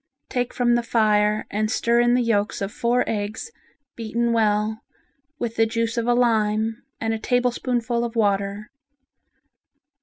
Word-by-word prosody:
Take 245 Hz, -1 st, -1 dB
from 240 Hz, -1 st, +1 dB
the 240 Hz, -, +2 dB
fire 215 Hz, -2 st, +2 dB
and 215 Hz, +1 st, 0 dB
stir 235 Hz, 0 st, +2 dB
in 240 Hz, 0 st, +4 dB
the 250 Hz, -, +2 dB
yolks 210 Hz, -3 st, 0 dB
of 195 Hz, 0 st, -3 dB
four 240 Hz, +3 st, +1 dB
eggs 215 Hz, -, -4 dB, 0.4 s
beaten 235 Hz, +1 st, -1 dB
well 215 Hz, 0 st, +1 dB, 0.6 s
with 235 Hz, -3 st, -4 dB
the 225 Hz, 0 st, +4 dB
juice 230 Hz, +1 st, -1 dB
of 235 Hz, -1 st, -1 dB
a 240 Hz, -, +3 dB
lime 220 Hz, -2 st, +1 dB, 0.2 s
and 225 Hz, 0 st, -1 dB
a 225 Hz, -, -3 dB
tablespoonful 245 Hz, 0 st, 0 dB
of 235 Hz, 0 st, -4 dB
water. 200 Hz, -1 st, 0 dB
225 Hz, 150 wpm, -23 LUFS, 215-240 Hz, 0.6 s, in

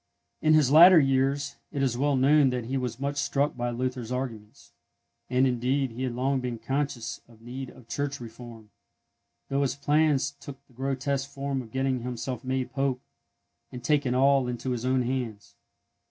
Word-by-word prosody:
In 155 Hz, 0 st, +5 dB
his 145 Hz, -4 st, +4 dB
latter 170 Hz, +3 st, +9 dB
years 135 Hz, 0 st, +1 dB
it 140 Hz, -2 st, -1 dB
is 130 Hz, -3 st, +1 dB
well 140 Hz, +3 st, +1 dB
known 140 Hz, +2 st, +5 dB
that 125 Hz, -2 st, -3 dB
he 130 Hz, +4 st, -3 dB
was 125 Hz, -2 st, -3 dB
much 140 Hz, +1 st, -2 dB
struck 140 Hz, +1 st, 0 dB
by 120 Hz, 0 st, -2 dB
Luther's 125 Hz, 0 st, -3 dB
arguments; 115 Hz, -5 st, -6 dB, 0.6 s
and, 130 Hz, +1 st, +3 dB
indeed, 130 Hz, +1 st, 0 dB
he 120 Hz, +3 st, -7 dB
had 125 Hz, -2 st, -2 dB
long 135 Hz, +2 st, 0 dB
been 125 Hz, -2 st, -4 dB
conscious 135 Hz, 0 st, -3 dB
of 115 Hz, -2 st, -19 dB
need 130 Hz, +2 st, -6 dB
of 125 Hz, -3 st, -16 dB
Church 140 Hz, +1 st, -3 dB
reform, 115 Hz, -2 st, -11 dB, 0.8 s
though 140 Hz, +1 st, +1 dB
his 135 Hz, -2 st, 0 dB
plans 145 Hz, -1 st, +2 dB
took 140 Hz, -1 st, -9 dB
the 130 Hz, -, -25 dB
grotesque 135 Hz, +2 st, -2 dB
form 140 Hz, -1 st, -3 dB
of 115 Hz, -, -12 dB
getting 130 Hz, 0 st, 0 dB
himself 125 Hz, 0 st, -4 dB
made 130 Hz, -1 st, -2 dB
Pope, 135 Hz, -1 st, 0 dB, 0.7 s
and 125 Hz, -1 st, -8 dB
taking 135 Hz, -1 st, +1 dB
all 135 Hz, 0 st, +4 dB
into 125 Hz, +1 st, -3 dB
his 125 Hz, -1 st, -3 dB
own 130 Hz, 0 st, +2 dB
hands. 120 Hz, -5 st, -4 dB
130 Hz, 175 wpm, -27 LUFS, 125-140 Hz, 0.8 s, latter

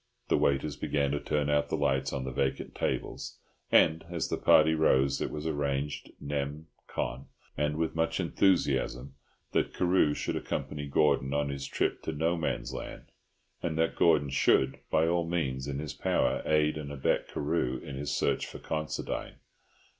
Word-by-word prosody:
The -, -, +4 dB
waiters 70 Hz, +2 st, +1 dB
began 70 Hz, -2 st, 0 dB
to 75 Hz, -, 0 dB
turn 75 Hz, 0 st, -1 dB
out 75 Hz, 0 st, +2 dB
the -, -, 0 dB
lights 70 Hz, -2 st, +1 dB
on 70 Hz, -2 st, -3 dB
the 65 Hz, -, -4 dB
vacant 65 Hz, +1 st, -1 dB
tables; -, -, -3 dB, 0.3 s
and, 80 Hz, +1 st, +5 dB
as 85 Hz, -2 st, -2 dB
the -, -, -1 dB
party 80 Hz, +1 st, +5 dB
rose 70 Hz, -3 st, +3 dB
it -, -, -1 dB
was 75 Hz, 0 st, -6 dB
arranged 70 Hz, -2 st, -2 dB
nem. 70 Hz, +2 st, -3 dB, 0.2 s
con., 65 Hz, +2 st, -4 dB, 0.3 s
and 75 Hz, +1 st, 0 dB
with 80 Hz, -1 st, 0 dB
much 80 Hz, +1 st, 0 dB
enthusiasm, 70 Hz, -8 st, +1 dB, 0.4 s
that -, -, 0 dB
Carew 90 Hz, -5 st, +3 dB
should -, -, -2 dB
accompany 70 Hz, +2 st, -3 dB
Gordon 70 Hz, -1 st, +2 dB
on 70 Hz, 0 st, +1 dB
his 70 Hz, -1 st, -4 dB
trip -, -, -1 dB
to 80 Hz, -, -4 dB
No 80 Hz, +3 st, +1 dB
Man's 80 Hz, -2 st, -2 dB
Land, -, -, -8 dB, 0.5 s
and 80 Hz, -2 st, -2 dB
that 80 Hz, 0 st, +1 dB
Gordon 80 Hz, -5 st, +3 dB
should, 65 Hz, 0 st, +3 dB
by 80 Hz, +1 st, +3 dB
all 85 Hz, 0 st, +2 dB
means 70 Hz, -6 st, -1 dB
in 70 Hz, -1 st, -3 dB
his 75 Hz, -2 st, -4 dB
power, 65 Hz, -, +1 dB
aid 75 Hz, 0 st, +3 dB
and 70 Hz, -1 st, -6 dB
abet 70 Hz, -2 st, 0 dB
Carew 70 Hz, -4 st, -1 dB
in 65 Hz, +2 st, -8 dB
his 70 Hz, +1 st, -3 dB
search -, -, 0 dB
for -, -, -8 dB
Considine. 75 Hz, -1 st, -4 dB
75 Hz, 170 wpm, -30 LUFS, 70-80 Hz, 0.5 s, and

